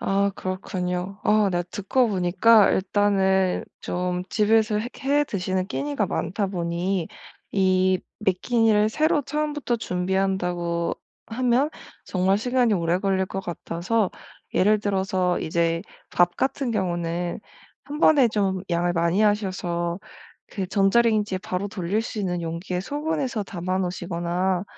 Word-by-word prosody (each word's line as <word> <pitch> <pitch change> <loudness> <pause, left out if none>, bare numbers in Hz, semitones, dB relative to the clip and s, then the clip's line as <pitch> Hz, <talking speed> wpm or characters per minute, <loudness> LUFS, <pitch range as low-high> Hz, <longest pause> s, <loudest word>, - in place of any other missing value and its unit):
아. 200 +1 +1
그렇군요. 185 0 -4
아 210 -1 +4
네 175 -1 0
듣고 235 +5 +1
보니까 195 +3 +4
일단은 190 -1 +2 0.2
좀 180 0 -2
집에서 215 0 +3
해 230 +3 -3 0.2
해 290 +2 +3
드시는 185 -4 -2
끼니가 280 -3 -2
많다 200 +4 -2
보니 175 0 -2 0.4
이 185 -1 +3 0.2
매 195 - +3
끼니를 215 +1 +2
새로 310 +4 +2
처음부터 295 -3 -2
준비한다고 180 -3 -1 0.3
하면 250 +5 +1 0.3
정말 190 +1 +1
시간이 245 0 +2
오래 170 0 +1
걸릴 190 -1 +1
것 195 - -5
같아서 180 +4 -2 0.4
예를 210 +3 +4
들어서 190 -3 0
이제 165 +1 0 0.3
밥 175 0 +2
같은 265 -1 -1
경우는 175 -3 -2 0.4
1 295 +1 -6
번에 290 -6 +5
좀 195 -3 0
양을 175 0 +1
많이 170 +4 +2
하셔서 185 -4 0 0.5
그 195 - -4
전자레인지에 205 0 +2
바로 185 +1 -3
돌릴 200 +1 -1
수 225 -1 -5
있는 180 -3 -1
용기에 170 +2 -3
소분해서 285 - -2
담아 185 -1 -3
놓으시거나 175 +1 -1
190 Hz, 275 characters per minute, -24 LUFS, 180-215 Hz, 0.5 s, 번에